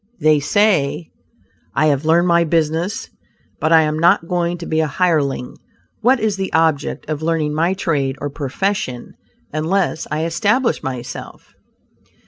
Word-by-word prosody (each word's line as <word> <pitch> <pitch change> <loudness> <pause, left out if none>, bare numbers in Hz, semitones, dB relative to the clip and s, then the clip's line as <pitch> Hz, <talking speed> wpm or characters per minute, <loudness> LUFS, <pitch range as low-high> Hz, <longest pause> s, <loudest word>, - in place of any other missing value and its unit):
They 155 -1 +4
say; 155 -3 +1 0.6
"I 155 - +3
have 145 -1 +1
learned 170 +3 +3
my 170 -1 +4
business, 165 +5 -1 0.5
but 155 - 0
I 160 -1 +7
am 155 0 -1
not 170 +1 +3
going 175 -1 -1
to 170 - -8
be 160 -1 -1
a 160 - +2
hireling; 145 -5 0 0.4
what 245 +3 +3
is 215 -3 0
the 190 0 -3
object 160 -3 0
of 155 -1 -3
learning 160 -2 0
my 165 +5 +1
trade 140 -8 -1
or 145 0 -4
profession, 145 -2 -3 0.4
unless 160 +2 -1
I 155 +1 -1
establish 210 +8 +1
myself?'" 125 -2 -7
160 Hz, 145 wpm, -19 LUFS, 150-180 Hz, 0.6 s, I